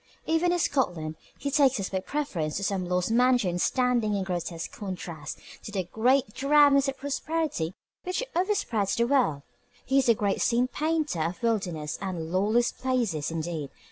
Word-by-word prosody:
Even 325 +2 +2
in 355 - +2
Scotland, 175 - 0 0.2
he 280 - -3
takes 270 -4 +4
us 195 - -2
by 190 - -1
preference 185 - -2
to 195 - -3
some 190 -2 -1
lost 180 +3 0
mansion 240 -7 +3
standing 245 -2 +2
in 195 - 0
grotesque 175 -3 -4
contrast 180 -5 -6 0.2
to - - -8
the 195 -2 -1
"great 225 +5 +1
drabness 280 0 +5
of 275 - -2
prosperity 285 - -2 0.3
which 365 +6 -2
overspreads 340 - +1
the 235 - +2
world." 240 - +2 0.4
He 270 +1 +3
is 255 - +2
a 230 - +6
great 205 -2 0
scene 245 +1 +2
painter 310 - -1
of 170 +7 -3
wildernesses 180 -10 -1
and 175 -4 -4
lawless 215 +6 +2
places, 235 - -1
indeed. 160 -3 -3
220 Hz, 165 wpm, -27 LUFS, 180-275 Hz, 0.4 s, a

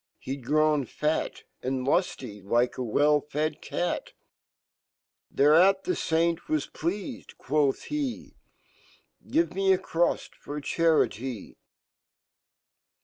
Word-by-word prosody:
He^d 135 0 -4
grown 150 +1 +2
fat 150 +1 -2 0.2
And 130 0 -2
lufly, 130 - -1
likeawell 125 +6 +2
fed 150 +1 -2
cat 175 - -3 1.2
^Thereat 175 +7 +5
fhe5aintwaj 165 - 0
pleafedjquofhhe, 200 - -2 1.0
Give 330 - +1
me 195 +1 +2
a 190 - +5
crufl 170 -1 0
,for 145 +1 -6
Charity 135 - 0
155 Hz, 80 wpm, -27 LUFS, 135-175 Hz, 1.2 s, ^Thereat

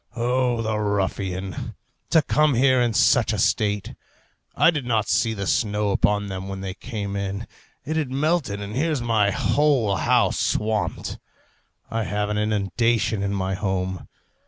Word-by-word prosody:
O 120 0 0
the 110 -1 -1
ruffian! 95 -3 -2 0.3
to 160 - +4
come 150 -1 +2
here 130 +1 +4
in 120 -1 +2
such - - +4
a - - -1
state! 105 -1 0 0.6
I - - +5
did 150 -5 -3
not 110 -3 0
see 110 -1 +1
the 100 -1 -4
snow 105 0 0
upon 105 +1 +1
them 95 -1 -5
when 95 0 -5
they 95 -1 -4
came 100 -2 -5
in; 100 +2 -3 0.4
it 155 +3 -2
had 150 -5 -1
melted, 140 -6 0
and 100 +1 -6
here's 155 +1 0
my 115 -4 +2
whole 125 -2 +2
house - - +2
swamped. 110 -1 -1 0.7
I 115 -1 -1
have 105 0 -2
an 105 0 -1
inundation 110 +1 0
in 100 0 -1
my 95 0 -1
home. 95 -1 -2
105 Hz, 160 wpm, -23 LUFS, 100-120 Hz, 0.7 s, I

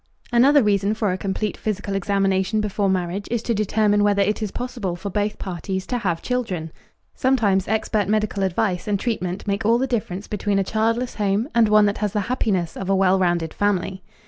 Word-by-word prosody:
Another 265 +4 +5
reason 205 0 +1
for 215 -3 0
a 185 - -1
complete 200 +2 -2
physical 205 -2 -3
examination 195 +1 +1
before 205 -1 0
marriage 185 +1 -1
is 235 -1 -1
to 235 - 0
determine 210 0 +2
whether 200 -1 +3
it 210 +3 -1
is 215 - -1
possible 240 -6 -4
for 195 +3 -6
both 205 +2 -1
parties 190 +1 -4
to 245 - -2
have 175 -6 -2
children. 195 -11 -2 0.4
Sometimes 210 -8 +2
expert 220 -2 0
medical 210 -1 0
advice 190 0 0
and 205 -2 0
treatment 190 -5 -3
make 200 +1 -1
all 230 +3 +4
the 260 - 0
difference 210 -6 -3
between 205 -1 -1
a 195 - +2
childless 230 +5 0
home 205 +3 0
and 230 -2 +4
one 210 0 +6
that 205 0 0
has 210 -2 -1
the 210 - +1
happiness 190 -6 -1
of 195 - -5
a 195 - +3
well 190 0 +3
rounded 175 -3 0
family. 190 -2 -1
205 Hz, 200 wpm, -22 LUFS, 190-220 Hz, 0.4 s, one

